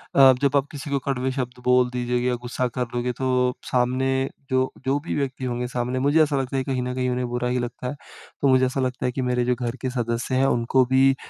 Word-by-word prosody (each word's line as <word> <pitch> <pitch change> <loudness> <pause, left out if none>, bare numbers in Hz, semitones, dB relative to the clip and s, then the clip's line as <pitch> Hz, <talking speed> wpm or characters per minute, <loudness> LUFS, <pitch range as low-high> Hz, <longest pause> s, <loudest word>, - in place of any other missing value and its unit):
अ, 135 -1 +8
जब 140 0 +2
आप 140 0 0
किसी 145 0 -7
को 140 0 +1
कड़वे 130 -1 -1
शब्द 125 -2 -4
बोल 125 0 +4
दीजिए 125 0 -1
या 125 - +1
गुस्सा 125 +1 -2
कर 125 - +1
लोगे 120 +1 0
तो 125 -1 +2 0.2
सामने 125 +1 +1 0.4
जो 130 -1 +3 0.2
जो 135 +2 +2
भी - - -2
व्यक्ति 135 -2 -2
होंगे 125 0 -2
सामने 125 +1 -2
मुझे 150 +3 +4
ऐसा 145 -2 0
लगता 135 +1 -3
है 130 - 0
कहीं 130 -2 -2
न 125 0 -3
कहीं 130 0 0
उन्हें 125 0 -1
बुरा 125 0 -1
ही 125 +1 0
लगता 120 +1 -4
है। 130 - -4 0.5
तो 140 - +3
मुझे 130 -1 +5
ऐसा 130 +2 -2
लगता 130 -1 -2
है 125 - +1
कि 130 - -3
मेरे 125 -1 +1
जो 125 0 +2
घर 120 -1 -2
के 130 - -1
सदस्य 120 0 -2
हैं 130 +1 +3
उनको 125 0 +2
भी 135 +1 +5
125 Hz, 250 wpm, -24 LUFS, 125-130 Hz, 0.5 s, अ